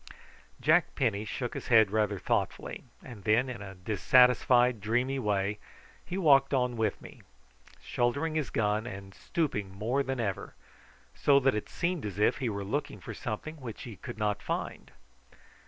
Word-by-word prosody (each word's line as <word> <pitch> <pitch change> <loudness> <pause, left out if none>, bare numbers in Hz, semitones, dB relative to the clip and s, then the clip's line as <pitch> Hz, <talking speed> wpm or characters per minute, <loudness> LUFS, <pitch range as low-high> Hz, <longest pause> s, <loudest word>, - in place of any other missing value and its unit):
Jack 160 +3 +3
Penny 110 -6 0
shook 120 +3 -4
his - - -6
head 110 -4 +5
rather 105 -2 +1
thoughtfully, - - -2 0.2
and 115 -6 -11
then, 115 +4 +3
in 120 -5 -6
a 95 -1 -8
dissatisfied 125 +4 +4
dreamy 125 +6 0
way, 105 -2 0 0.4
he 180 - -5
walked 140 -6 +4
on 125 -2 +1
with 110 -3 -1
me, - - -13 0.6
shouldering 140 +7 0
his 155 -4 -1
gun, 105 +1 0
and 95 -2 -8
stooping 105 - -2
more 110 +8 -1
than 135 -2 -3
ever, 100 -5 -3 0.6
so 140 -1 +4
that 135 0 +3
it 105 - -4
seemed 170 -2 -2
as 100 -2 -5
if 105 - +2
he 125 - -1
were 100 -2 -4
looking 140 +9 -3
for - - -8
something 145 +6 -5
which 120 -6 -8
he 115 -4 -8
could 120 +2 -8
not 105 -1 -1
find. - - -4
120 Hz, 165 wpm, -30 LUFS, 105-135 Hz, 0.6 s, head